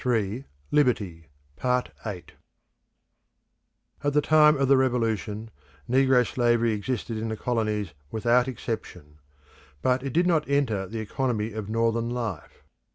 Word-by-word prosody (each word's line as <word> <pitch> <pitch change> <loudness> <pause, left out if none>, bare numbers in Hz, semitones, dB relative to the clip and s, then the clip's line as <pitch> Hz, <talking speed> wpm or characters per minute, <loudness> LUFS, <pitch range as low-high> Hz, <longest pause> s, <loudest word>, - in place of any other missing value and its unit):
Abolition 115 0 0 0.3
in 150 - +5
America 95 - -1 0.4
At 125 -6 -2 1.8
the 150 - +4
time 150 0 +5
of 135 0 +1
the 135 - +6
Revolution, 115 -4 0 0.4
negro 130 -1 +4
slavery 120 -1 +2
existed 110 +1 -3
in 110 - -3
the 110 - -3
colonies 105 -6 -1 0.2
without 120 - +2
exception. 110 - -6 0.6
But 130 0 +2
it 135 0 -4
did 175 +7 +2
not 160 -5 +1
enter 115 -9 +1
the 110 +3 -5
economy 115 -1 -2
of 105 -1 -5
Northern 115 +1 +1
life. 115 -9 -5
115 Hz, 125 wpm, -26 LUFS, 110-130 Hz, 1.8 s, the